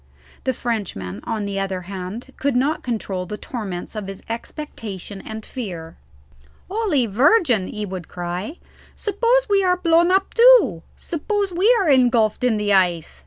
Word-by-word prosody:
The 260 - +1
Frenchman, 175 - -3
on 215 -2 -2
the 200 -1 -3
other 190 -1 -2
hand, 195 +7 -7
could 280 -2 0
not 280 +5 +1
control 195 -6 -3
the 210 - -5
torments 205 -6 -6
of 210 -2 -4
his 195 -1 -8
expectation 220 - -7
and 220 0 -7
fear. 175 -10 -6 0.7
"Holy 385 - +1
Virgin!" 245 - +3
he 210 0 -4
would 185 -3 -6
cry, 180 - -5 0.4
"suppose 475 +4 +1
we 400 -2 +3
are 360 -1 +3
blown 340 -1 +3
up 385 +1 +2
too? 465 - +6
suppose 400 +4 -2
we 380 +7 +4
are 385 - +1
engulphed 245 -5 +3
in 240 -3 +2
the 205 -1 +1
ice? 175 -4 +1
225 Hz, 155 wpm, -21 LUFS, -, 0.7 s, too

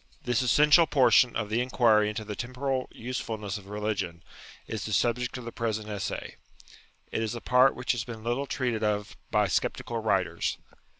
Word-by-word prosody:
This 125 -1 +1
essential 150 +6 +5
portion 130 -3 +4
of 105 -2 -2
the 115 +2 +2
inquiry 115 -4 +3
into 105 0 -5
the 105 0 -5
tem 125 +4 -6
poral 135 -1 -1
usefulness 110 -4 -4
of 100 - -16
religion, 105 -5 -3 0.4
is 110 -3 -4
the 110 - -4
subject 120 +3 +1
of 125 - -8
the 115 - -5
present 110 -2 -3
Essay. 100 -2 -4 0.7
It - - -1
is 110 +1 -2
a - - -4
part 125 +3 +4
which 125 - -1
has 120 -3 -1
been 110 -2 -8
little 120 +4 -1
treated 120 -4 -1
of 105 -1 -1
by - - +3
sceptical 120 -2 -1
writers. 95 -6 0
115 Hz, 180 wpm, -28 LUFS, 105-125 Hz, 0.7 s, essential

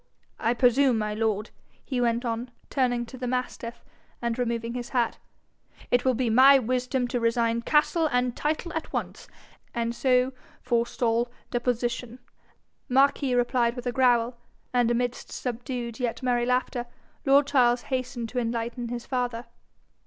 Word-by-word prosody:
I 230 +2 +1
presume, 250 +1 +4
my 210 -1 -1
lord,' 215 0 -1 0.3
he 255 -3 -1
went 235 +1 +1
on, 235 +1 -2 0.2
turning 245 -3 +1
to 255 +2 -11
the 250 - -3
mastiff, 245 -1 -4 0.3
and 235 0 -2
removing 235 -1 -1
his 245 -1 -5
hat, 240 -3 0 0.7
'it 245 - +3
will 260 -1 +2
be 250 +1 0
my 260 +5 +7
wisdom 250 +1 0
to 245 - -1
resign 230 0 +1
castle 310 +4 +2
and 250 -1 +1
title 310 +2 -2
at 320 - -4
once, - - -4 0.5
and 235 0 -1
so 255 +1 +2 0.3
forestall 235 -1 0 0.2
deposition.' 240 0 -1 0.7
Marquis 270 0 +3
replied 245 -1 +2
with 245 -1 -7
a 245 - 0
growl, 240 -1 +2 0.3
and 245 -2 +3
amidst 245 +1 -1
subdued 240 -1 -4
yet 245 0 -2
merry 245 -1 +1
laughter, 250 -1 0 0.4
lord 275 +1 +5
Charles 245 -4 +3
hastened 250 -2 -2
to 250 - -2
enlighten 235 +1 -2
his 240 0 -5
father. 245 -2 -2
245 Hz, 145 wpm, -26 LUFS, 235-255 Hz, 0.7 s, my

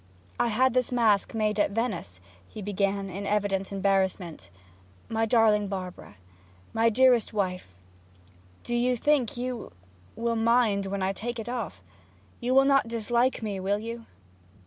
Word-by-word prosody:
'I - - +3
had 245 +3 +2
this 250 -1 +1
mask 225 -4 +2
made 215 -1 0
at - - +3
Venice,' 200 - -3 0.3
he - - -10
began, 200 0 -1
in 195 +2 -5
evident 200 -2 0
embarrassment. 190 - -1 0.6
'My 225 0 0
darling 215 -3 +3
Barbara 185 - -7 0.6
my 225 +1 +3
dearest 245 -1 +3
wife 180 - -3 0.9
do 240 - -2
you 245 +1 +1
think 270 -3 +1
you 245 -1 -4 0.4
will 230 0 -1
mind 225 -3 +2
when 195 0 -2
I 190 +1 0
take 240 +4 -5
it 225 0 -6
off? 245 -1 -5 0.6
You 250 +1 0
will 270 0 +6
not 275 -3 +3
dislike 235 +2 0
me 205 -3 -3
will 195 +2 0
you?' 230 +2 -7
220 Hz, 145 wpm, -27 LUFS, 195-240 Hz, 0.9 s, will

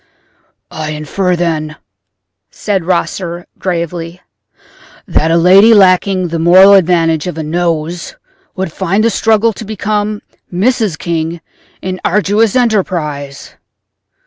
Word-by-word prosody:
"I 155 -1 -5
infer, 180 +5 -2
then," 155 -3 -2 0.7
said 195 -5 -3
Rosser, 175 -1 -2
gravely, 170 -1 -4 0.9
"that 165 -3 0
a 165 - +3
lady 195 +6 +6
lacking 185 -1 +3
the 165 0 -3
moral 185 +4 +6
advantage 165 -4 +2
of 175 - -5
a 160 - -3
nose 170 +1 -3 0.4
would 190 -3 -3
find 195 +3 0
the 230 - +2
struggle 220 +2 +1
to 215 - -9
become 210 0 -3 0.3
Mrs. 210 -1 0
King 165 0 -3 0.4
an 185 0 -4
arduous 210 +3 +1
enterprise." 170 - -2
180 Hz, 115 wpm, -13 LUFS, 165-200 Hz, 0.9 s, lady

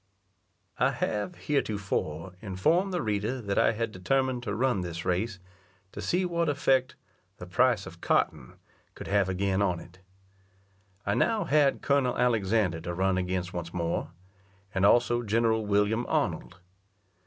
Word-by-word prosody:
I - - +4
have, 110 - -2
heretofore, 95 - -2
informed 155 - +1
the 180 - -1
reader 110 +4 -1
that 100 -4 -1
I - - +4
had 115 0 -2
determined 130 +6 0
to 105 -4 -3
run 125 -4 +1
this 85 -1 -5
race 95 +3 -1 0.5
to - - -7
see 180 +1 +1
what 170 -2 0
effect 135 -3 +1 0.4
the 90 - -8
price 115 +3 +2
of - - -11
cotton - - 0 0.4
could - - -8
have 100 -1 +2
again 95 +1 0
on 90 -3 +1
it. 85 +2 -14 1.1
I 100 - +1
now 225 - +2
had 145 -3 +2
Col. 140 -3 +2
Alexander 110 -7 +1
to 85 +1 -4
run 95 0 +1
against 90 0 -2
once 85 0 -5
more, 85 -2 -1 0.6
and 95 +1 +3
also 120 +1 +3
General 110 -1 +1
William 105 +3 +1
Arnold. 90 - -1
105 Hz, 145 wpm, -28 LUFS, 95-125 Hz, 1.1 s, I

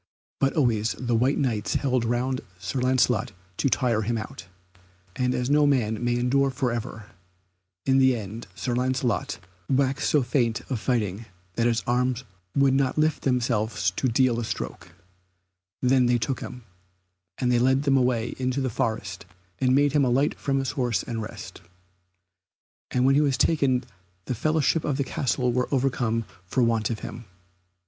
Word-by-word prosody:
But 135 - +2
always 115 -6 +1
the 120 -2 -2
white 125 +5 +2
Knights 115 -7 -1
held 130 -4 +1
round 125 +2 -1 0.2
Sir 115 +8 -3
Lancelot 125 -2 +2 0.2
to 140 - +1
tire 115 -1 +1
him 115 +2 -1
out. 100 -5 -7 0.7
And 125 0 0
as 125 0 -1
no 145 +1 +4
man 115 -5 +1
may 120 0 +1
endure 135 +3 +2
for 130 -1 -1
ever, 115 -2 -6 0.7
in 135 0 +4
the 130 -1 +5
end 110 +1 -7
Sir 125 - -2
Lancelot 125 -2 0 0.3
waxed 135 +1 +1
so 145 -3 +3
faint 120 -2 0
of 125 - -1
fighting 110 -3 -1 0.3
that 115 +3 +1
his 115 -1 +1
arms 125 +1 0 0.3
would 140 -1 +4
not 135 0 +1
lift 155 0 +2
themselves 110 -8 0
to 130 - -1
deal 125 0 +2
a - - -2
stroke; 110 - -6 0.9
then 125 0 +4
they 120 0 +3
took 125 +3 -2
him, 125 -1 -8 0.7
and 125 -1 +1
led 130 +3 +2
him 135 - +5
away 125 -3 +1
into 130 +1 -1
the 130 -2 -1
forest 100 -3 -3 0.3
and 130 0 +3
made 145 +1 +4
him 145 0 +3
alight 130 +3 +2
from 135 -1 0
his 135 0 -1
horse 125 -6 0
and 115 -2 -4
rest, 105 - -8 1.3
and 125 0 +1
when 135 - +5
he 145 - +4
was 140 -3 +1
taken 135 -5 +2 0.4
the - - -2
fellowship 155 +5 +1
of 140 -3 -1
the 140 - +1
castle 125 -2 -1
were 125 +1 0
overcome 125 -4 0 0.2
for 125 +6 +1
want 115 -2 +1
of 115 -2 -4
him. 120 - -7
125 Hz, 170 wpm, -25 LUFS, 115-135 Hz, 1.3 s, the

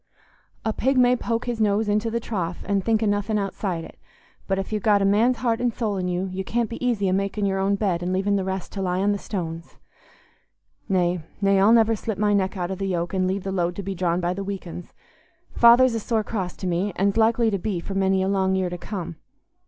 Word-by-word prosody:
A 220 - +1
pig 265 +4 +1
may 250 0 +5
poke 230 -1 -2
his 240 -2 -2
nose 210 +1 +2
into 210 +2 +1
the 235 +1 -1
trough 185 -7 -4
and 195 -1 0
think 225 +1 +1
o' - - +2
nothing 205 +1 0
outside 190 -3 -3
it; - - -13 0.5
but 195 - 0
if 195 +2 -4
you've 210 - -1
got 205 -1 +3
a - - +2
man's 225 +5 +3
heart 235 -1 0
and 245 -1 +1
soul 215 -3 -2
in 180 -1 -2
you, 180 +1 -1
you 190 +1 -3
can't 235 +3 -1
be 230 - -6
easy 230 -6 +1
a 185 - +1
making 200 +1 -1
your 195 -1 0
own 195 +1 +2
bed 190 -4 0
an' 180 +1 -2
leaving 195 +2 +1
the 195 - 0
rest 190 -1 -4
to 195 - -5
lie 180 -1 0
on 200 +2 +2
the 205 - -1
stones. 165 -5 -6 1.1
Nay, 180 -2 +1 0.2
nay, 195 -1 +3
I'll 200 +3 +5
never 225 -1 +5
slip 220 0 -4
my 205 0 +2
neck 195 -1 0
out 180 0 -2
o' - - -2
the 195 +1 -3
yoke, 175 -2 -2
and 185 -1 +1
leave 190 +1 -2
the 195 - -3
load 175 -2 -1
to 200 - -5
be 195 +1 -3
drawn 175 -1 0
by 175 0 0
the 195 +2 -4
weak 195 -1 -5
uns. 175 +1 -8 0.6
Father's 240 +1 +6
a 225 - -1
sore 220 0 -1
cross 190 -4 -4
to - - -7
me, 180 +3 0
an's 195 +2 +1
likely 225 0 +3
to 200 - -1
be 195 -1 -2
for 195 - -6
many 190 -1 +2
a - - 0
long 190 -1 +1
year 185 -2 -1
to 180 - -5
come. 175 -4 -6
195 Hz, 255 wpm, -24 LUFS, 185-220 Hz, 1.1 s, Father's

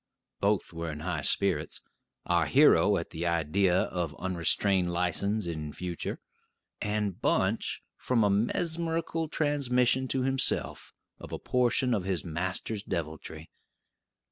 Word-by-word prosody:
Both 100 -3 0
were 85 -1 -4
in 75 0 -7
high 90 +2 -2
spirits: - - +1 0.5
our - - +2
hero - - +5
at - - -5
the 85 +2 -3
idea 90 +3 +2
of 85 -5 -4
unrestrained 90 +1 +1
license 90 +5 0
in 80 -3 -4
future; 90 -2 -5 0.6
and 105 -2 -2
Bunch - - 0
from 120 -3 +1
a 105 - +3
mesmerical 165 - 0
transmission 130 -4 +1
to 130 0 -1
himself 135 0 0 0.3
of - - -10
a - - -3
portion 125 0 +1
of 100 -5 -1
his 95 -3 -1
master's 95 +5 -2
deviltry. 80 -3 -5
95 Hz, 125 wpm, -29 LUFS, 85-125 Hz, 0.6 s, hero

